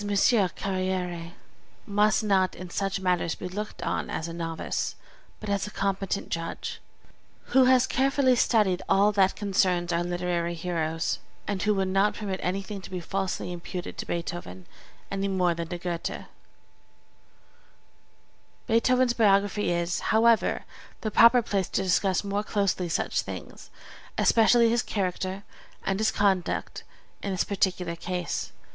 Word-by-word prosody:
Carrière 185 -4 0 0.5
must 210 +1 +2
not 190 -3 +2
in 180 -1 -9
such 195 +1 -1
matters 180 -3 0
be - - -6
looked 210 +4 -6
on - - -2
as 160 - -3
a 165 - -6
novice, 165 -1 -3 0.4
but 215 - -8
as 200 0 0
a - - -5
competent 195 -1 -2
judge, 165 0 -4 0.7
who 265 -1 +7
has 255 0 +5
carefully 265 0 +2
studied 210 -6 +2
all 200 +2 +5
that 195 -2 +3
concerns 185 -4 +1
our 170 +1 +1
literary 175 -1 -1
heroes, 165 -1 -2 0.3
and 200 -2 -2
who 210 0 +2
would 190 -1 0
not 195 +2 +2
permit 195 -3 -4
anything 195 +2 -3
to - - -10
be 185 -1 -4
falsely 190 0 -3
imputed 175 +1 -6
to - - -5
Beethoven 170 - -5 0.5
any 195 0 -1
more 180 -3 +2
than 170 0 -4
to 175 - -4
Goethe. 175 -1 -4 2.4
Beethoven's 250 +2 +3
biography 205 -2 +3
is, 170 0 0
however, 225 +1 +3 0.4
the 215 - -2
proper 235 +3 +7
place 195 -4 -1
to 195 - 0
discuss 190 +1 +2
more 200 0 -1
closely 200 -4 0
such - - 0
things, - - -9 0.5
especially 235 +1 +5
his 235 +1 +2
character 190 -1 -3 0.4
and 195 +1 0
his 220 - +3
conduct 190 -3 0 0.4
in 200 - -3
this 185 -2 0
particular 185 -3 -1
case. 180 0 -3
190 Hz, 140 wpm, -27 LUFS, 175-210 Hz, 2.4 s, who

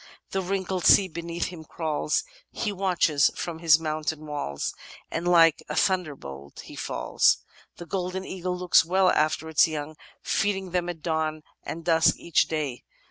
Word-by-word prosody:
The 190 - 0
wrinkled 190 -1 -2
sea 195 - +7
beneath 170 0 -4
him 170 -3 -10
crawls; 155 -1 -1 0.3
He 210 - -3
watches 180 -7 +2
from 165 -2 -5
his 165 -1 +6
mountain 155 -1 -3
walls, 145 - -4 0.2
' - - -21
And 170 +2 -2
like 165 -3 +5
a - - -3
thunderbolt 140 - -2
he - - -12
falls. - - +1 0.4
The 175 - -8
Golden 185 +1 -3
Eagle 180 -1 -4
looks 180 -2 +4
well 185 +2 +3
after 155 +1 +1
its 160 0 +4
young, 155 -1 -5 0.3
feeding 190 -2 -1
them 175 0 -1
at 165 -3 -7
dawn 155 -1 -1 0.2
and 165 0 -7
dusk 165 -1 +4
each 170 - +1
day. 150 -6 -3
165 Hz, 160 wpm, -26 LUFS, 155-180 Hz, 0.4 s, sea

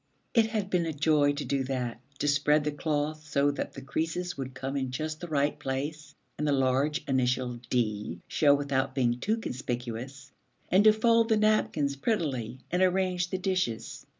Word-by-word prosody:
It 230 -2 +4
had 210 -3 -2
been 175 -2 +1
a 160 - -2
joy 145 -1 +3
to 145 - -4
do 140 -1 0
that, 125 -3 -3 0.2
to 145 - -1
spread 145 +1 +3
the 150 - -1
cloth 150 +1 -2
so 145 0 +3
that 140 - -4
the 135 - -9
creases 165 +5 -2
would 130 -1 -6
come 135 +2 -4
in 135 -2 -1
just 155 +4 -4
the 175 - -6
right 145 -1 0
place, 145 +2 -4 0.2
and 150 - 0
the - - +3
large 135 +2 +1
initial 125 -2 0
'D' 105 -7 -1
show 145 -2 +4
without 135 -2 -1
being 120 -2 +1
too 215 - 0
conspicuous, 125 - -5 0.4
and 190 +3 +5
to 215 - +9
fold 230 +1 +3
the 220 - +4
napkins 210 -10 +2
prettily 135 - -1
and 180 +1 +1
arrange 185 -1 +2
the 185 - -2
dishes. 185 - -2
145 Hz, 180 wpm, -29 LUFS, 130-175 Hz, 0.4 s, to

